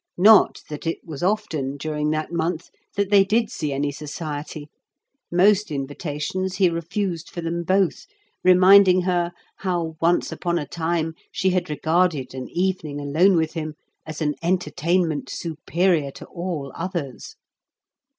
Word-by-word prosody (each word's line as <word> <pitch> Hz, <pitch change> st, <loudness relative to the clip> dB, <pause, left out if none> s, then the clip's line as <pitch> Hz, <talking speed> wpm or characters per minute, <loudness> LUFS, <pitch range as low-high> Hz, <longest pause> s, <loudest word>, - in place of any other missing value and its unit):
Not 210 Hz, +4 st, +6 dB
that 150 Hz, +2 st, -6 dB
it 165 Hz, -, 0 dB
was 155 Hz, -5 st, -7 dB
often, 175 Hz, -9 st, -1 dB
during 150 Hz, 0 st, -2 dB
that 155 Hz, +2 st, -2 dB
month, 170 Hz, 0 st, -2 dB, 0.2 s
that 200 Hz, 0 st, 0 dB
they 200 Hz, -1 st, +7 dB
did 220 Hz, +3 st, +1 dB
see 150 Hz, -3 st, -3 dB
any 140 Hz, +1 st, -1 dB
society; 150 Hz, 0 st, -6 dB, 0.6 s
most 200 Hz, +4 st, +4 dB
invitations 150 Hz, +6 st, -3 dB
he 185 Hz, -2 st, +3 dB
refused 170 Hz, +1 st, -3 dB
for 175 Hz, -, -6 dB
them 170 Hz, +1 st, -2 dB
both, 190 Hz, -, +1 dB, 0.4 s
reminding 185 Hz, 0 st, +7 dB
her 175 Hz, -1 st, 0 dB, 0.3 s
how 170 Hz, -4 st, -2 dB
once 170 Hz, +1 st, +2 dB
upon 175 Hz, -1 st, -1 dB
a 150 Hz, -, -2 dB
time 165 Hz, 0 st, -2 dB, 0.2 s
she 190 Hz, -, +1 dB
had 180 Hz, -3 st, -1 dB
regarded 160 Hz, -3 st, +1 dB
an 130 Hz, -1 st, -6 dB
evening 175 Hz, -5 st, -2 dB
alone 160 Hz, +7 st, +3 dB
with 160 Hz, -1 st, 0 dB
him 155 Hz, -2 st, -4 dB, 0.3 s
as 155 Hz, 0 st, -8 dB
an 150 Hz, -1 st, +1 dB
entertainment 170 Hz, -1 st, 0 dB
superior 165 Hz, -1 st, 0 dB
to -, -, -11 dB
all 170 Hz, -6 st, -5 dB
others. 165 Hz, -, -5 dB
170 Hz, 140 wpm, -23 LUFS, 150-185 Hz, 0.6 s, they